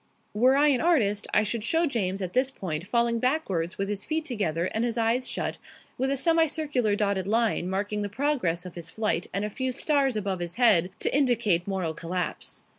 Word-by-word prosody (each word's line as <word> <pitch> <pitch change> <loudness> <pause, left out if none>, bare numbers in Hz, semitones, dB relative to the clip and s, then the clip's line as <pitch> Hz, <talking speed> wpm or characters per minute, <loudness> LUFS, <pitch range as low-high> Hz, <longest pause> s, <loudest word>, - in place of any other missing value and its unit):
Were 250 +5 +4
I 295 +2 +4
an 265 -4 +2
artist, 220 -12 +2
I 210 - +3
should 215 +1 -2
show 325 +8 +2
James 200 - -1
at 180 - -5
this 255 +1 +2
point 180 - -5
falling 235 +1 +1
backwards 215 - -1
with 195 - -1
his 205 0 -3
feet 315 0 -2
together 175 - -1
and 220 +4 -1
his 240 -1 -1
eyes 230 +3 +1
shut, - - -3 0.4
with 265 +1 -1
a 275 - 0
semi 325 +3 +3
circular 280 -9 0
dotted 200 -2 0
line 220 -4 +1
marking 205 +2 -2
the 205 - -3
progress 205 - -1
of 180 - -8
his 170 -2 -7
flight 210 -2 -1
and 200 +2 -2
a - - -3
few 260 +3 -2
stars 275 -1 +1
above 195 -3 -2
his 175 -1 -4
head 210 -8 +5
to - - +1
indicate 235 -10 +2
moral 185 -5 -2
collapse. 175 +2 -4
215 Hz, 205 wpm, -26 LUFS, 190-260 Hz, 0.4 s, head